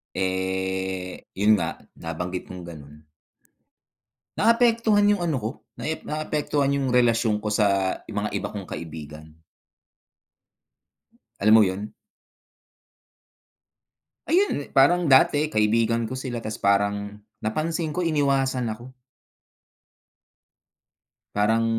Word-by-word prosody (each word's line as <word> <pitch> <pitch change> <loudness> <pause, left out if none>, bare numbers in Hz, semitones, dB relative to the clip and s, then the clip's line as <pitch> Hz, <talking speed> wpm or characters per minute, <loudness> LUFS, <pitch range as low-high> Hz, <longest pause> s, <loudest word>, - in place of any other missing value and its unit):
Eh, 95 0 -2 0.2
'yun 105 +2 +5
nga, 85 -6 -1 0.2
nabanggit 90 +2 -5
mong 90 -1 -8
gano'n. 75 -2 -12 1.3
Naapektuhan 230 -2 +4
'yung 205 -3 +2
ano 155 -5 0
'ko, 110 - -2 0.3
naep 160 0 -4
naapektuhan 150 -2 -1
'yung 135 -2 -1
relasyon 115 -3 +2
ko 105 - -2
sa 100 -3 +1
mga - - -3
iba - - -5
kong - - -6
kaibigan. 75 -2 -8 2.1
Alam 110 +2 +5
mo 110 -1 +8
yun? 100 +2 -3 2.3
Ayun, 355 - +1
parang 170 +6 +5
dati 145 +3 +5
kaibigan 115 0 +1
ko 130 - -4
sila 120 -3 -5
tas 110 0 -5
parang 100 +1 0 0.2
napansin 155 +7 -2
ko 180 - 0
iniwasan 135 -5 +1
ako. 120 +4 -7 2.4
Parang 110 +2 +2
110 Hz, 100 wpm, -24 LUFS, 95-145 Hz, 2.4 s, mo